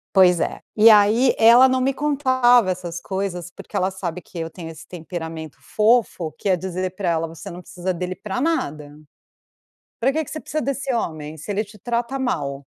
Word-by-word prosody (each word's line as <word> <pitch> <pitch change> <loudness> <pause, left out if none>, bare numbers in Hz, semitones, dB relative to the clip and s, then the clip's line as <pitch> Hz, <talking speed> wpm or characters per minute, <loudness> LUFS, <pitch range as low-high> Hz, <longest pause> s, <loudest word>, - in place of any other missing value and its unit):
Pois 180 -3 +6
é, - - -2 0.2
e 220 +1 +7
aí 215 +4 +5
ela 240 +4 +7
não 260 0 +1
me 265 +2 +1
contava 260 -6 +3
essas 175 -2 -4
coisas, 185 -2 -4
porque - - -8
ela 185 - +1
sabe 180 -2 -5
que 175 - -13
eu 165 -1 -3
tenho 165 -1 -9
esse 160 - -11
temperamento 160 -2 -7
fofo 210 - +1
que 200 - -2
é 185 - +3
dizer 185 +1 -4
pra 190 -4 -1
ela: 165 0 -1
"Você 165 0 -9
não 175 +1 -8
precisa 180 +1 -4
dele 180 +1 -4
pra 210 +5 -4
nada, 150 - -2 1.1
pra 260 +3 +2
que 315 +3 0
que - - -12
você 310 - -5
precisa 310 0 -3
desse 275 0 -2
homem, 155 -8 -4
se 155 +7 -8
ele 205 +2 0
te 210 +1 -16
trata 240 +3 -2
mal, 140 - -2
190 Hz, 195 wpm, -22 LUFS, 170-240 Hz, 1.1 s, e